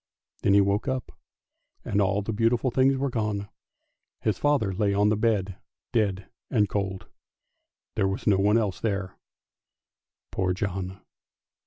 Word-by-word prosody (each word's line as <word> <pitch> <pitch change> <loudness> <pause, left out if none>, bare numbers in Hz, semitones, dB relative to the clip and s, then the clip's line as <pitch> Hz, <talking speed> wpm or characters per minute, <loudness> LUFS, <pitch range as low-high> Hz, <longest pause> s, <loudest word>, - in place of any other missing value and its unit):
Then 100 - +4
he 100 - +7
woke 100 +2 +1
up, 130 -1 -2 0.7
and 105 - +1
all 100 +1 +1
the 110 - -3
beautiful 115 +4 +2
things 135 +2 +3
were 135 0 -1
gone; 105 -3 -2 0.7
his 110 - 0
father 140 -10 +2
lay 100 +1 +1
on 105 +1 +4
the 110 - +3
bed 100 -4 0 0.4
dead 100 -4 0 0.2
and 105 -5 +3
cold, 95 -2 -2
and - - -28 0.9
there 95 - +3
was 95 +2 -3
no 100 -3 +4
one 105 +3 +4
else 105 -5 -1
there, 100 -4 -2 1.2
poor 95 -1 0
John! 95 0 -4
100 Hz, 150 wpm, -26 LUFS, 95-115 Hz, 1.2 s, he